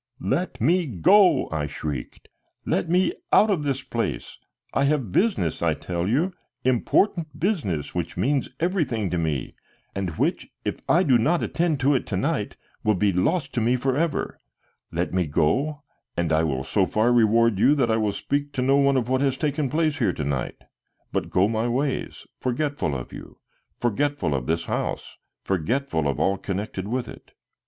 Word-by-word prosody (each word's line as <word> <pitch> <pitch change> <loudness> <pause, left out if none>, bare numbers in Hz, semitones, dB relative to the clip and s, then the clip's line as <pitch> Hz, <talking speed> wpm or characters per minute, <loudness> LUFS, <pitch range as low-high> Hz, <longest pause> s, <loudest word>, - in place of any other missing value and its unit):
"Let 160 +7 -1
me 170 +7 +2
go!" 180 - +4
I 75 -2 -1
shrieked. 70 -3 -6 0.4
"Let 100 - 0
me 180 +1 +3
go - - -7
out 215 0 +5
of 180 -6 +1
this 135 -2 -2
place. 115 -3 -4 0.3
I 135 - +2
have 140 -8 0
business, 180 - +1
I 80 -2 +2
tell 85 +1 -3
you, 155 - +1 0.3
important 150 - +1
business 145 - -1
which 85 -2 -3
means 140 +1 +1
everything 150 - 0
to 90 - 0
me, 75 -6 -2 0.4
and 95 -2 -2
which, - - 0 0.2
if - - -2
I 175 +3 +5
do 130 -8 +4
not 165 +9 +2
attend 165 -5 0
to 140 +3 +4
it 130 - -1
to - - -2
night, - - -1 0.3
will 105 -1 +3
be 100 +1 +2
lost 140 - 0
to 120 - 0
me 120 +3 +3
forever. 135 +5 -1 0.5
Let - - -2
me 90 -3 +1
go, 135 - 0 0.3
and 85 -2 +1
I 80 +1 +3
will 65 -4 -1
so 95 +5 +1
far 115 +3 +2
reward 115 -2 +4
you 145 +7 +5
that 125 -5 +2
I 110 - +2
will 105 -2 +1
speak 145 +6 -2
to 125 - -1
no 135 +2 +4
one 140 -1 +3
of 120 -3 0
what 130 +1 +1
has 135 -2 +1
taken 145 -2 -1
place 155 +1 0
here 115 - +2
to 75 - -4
night, 70 -2 -3 0.5
but - - -2
go 95 +2 +3
my 110 +1 0
ways, 130 +3 -2
forgetful 140 - -1
of 60 - -6
you, - - -10 0.4
forgetful 135 - 0
of 65 -2 -2
this 85 +1 0
house, - - -3 0.3
forgetful 95 - 0
of 70 - -1
all 95 0 +1
connected 100 0 -4
with 125 +3 -2
it." - - -12
125 Hz, 180 wpm, -24 LUFS, 90-145 Hz, 0.5 s, out